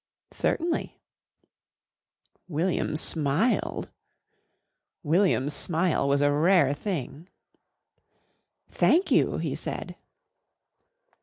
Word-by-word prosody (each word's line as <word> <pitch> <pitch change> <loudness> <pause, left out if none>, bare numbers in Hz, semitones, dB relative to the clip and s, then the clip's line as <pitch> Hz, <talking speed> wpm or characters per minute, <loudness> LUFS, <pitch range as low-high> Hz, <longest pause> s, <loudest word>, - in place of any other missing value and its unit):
"Certainly." 335 0 -2 1.5
William 170 0 -1
smiled. 155 - 0 1.1
William's 155 -4 +1
smile 165 -2 0
was 140 0 +2
a 145 0 +3
rare 150 -1 +3
thing. 155 - -5 1.4
"Thank 355 +4 +2
you," - - +2
he - - -3
said. - - -5
160 Hz, 70 wpm, -26 LUFS, 145-185 Hz, 1.5 s, a